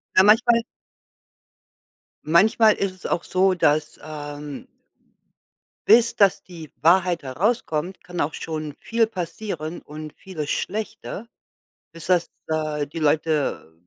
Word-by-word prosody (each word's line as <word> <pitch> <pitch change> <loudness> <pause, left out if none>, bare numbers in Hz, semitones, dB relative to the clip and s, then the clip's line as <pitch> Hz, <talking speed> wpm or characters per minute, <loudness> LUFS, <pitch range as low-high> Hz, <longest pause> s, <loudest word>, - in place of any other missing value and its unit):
Ja 185 - +7
manchmal 230 +3 +5 1.6
manchmal 215 +7 +5
ist 195 -1 -1
es 185 - -16
auch 175 - -1
so, 190 +1 +2
dass, 155 -3 +1
ähm 145 -1 -7 1.2
bis 230 +2 +6
dass 200 -3 +3
die 165 -5 -11
Wahrheit 175 +1 +3
herauskommt, 175 - -1
kann 180 -1 -4
auch 150 +1 -1
schon 155 -2 -5
viel 230 -1 +1
passieren 175 -4 -5
und 155 0 -9
vieles 155 -6 -7
Schlechte 215 0 -4 0.7
bis 165 0 -9
das 180 -2 +2 0.2
da 155 -2 -1
die 145 +3 -8
Leute 150 - 0
165 Hz, 115 wpm, -23 LUFS, 150-195 Hz, 1.6 s, Ja